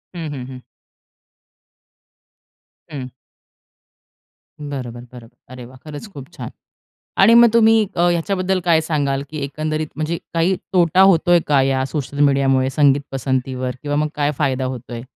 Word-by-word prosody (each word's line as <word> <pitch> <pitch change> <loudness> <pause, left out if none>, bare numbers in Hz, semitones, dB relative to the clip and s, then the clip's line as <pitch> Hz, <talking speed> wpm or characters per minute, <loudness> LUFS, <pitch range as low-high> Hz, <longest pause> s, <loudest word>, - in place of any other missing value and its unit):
हं, 165 -3 -5
हं, 125 -3 -6
हं. 130 -1 -10 2.3
हं. 135 -4 -6 1.5
बरोबर, 130 -5 -6
बरोबर. 120 -1 -14
अरे 130 -1 -10
वाह! 130 +2 -14
खरंच 150 +6 -9
खूप 135 -2 -10
छान. - - -7 0.7
आणि 210 +4 +6
मग 235 0 +7
तुम्ही 225 -1 +5
अ, - - 0
ह्याच्याबद्दल 185 +2 0
काय 165 -2 +4
सांगाल, 140 -3 -1
की 155 - -7
एकंदरीत 155 +2 -3
म्हणजे 155 +2 -2 0.2
काही 170 +3 +2 0.2
तोटा 180 0 +4
होतोय 175 -2 +5
का 140 -2 +3
या 135 0 +1
सोशल 140 0 -5
मीडियामुळे 135 -2 +2
संगीत 140 -1 +3
पसंतीवर 130 -1 -2
किंवा 145 0 -3
मग 150 0 0
काय 145 0 0
फायदा 130 -1 0
होतोय? 120 -2 -6
145 Hz, 140 wpm, -19 LUFS, 130-165 Hz, 2.3 s, मग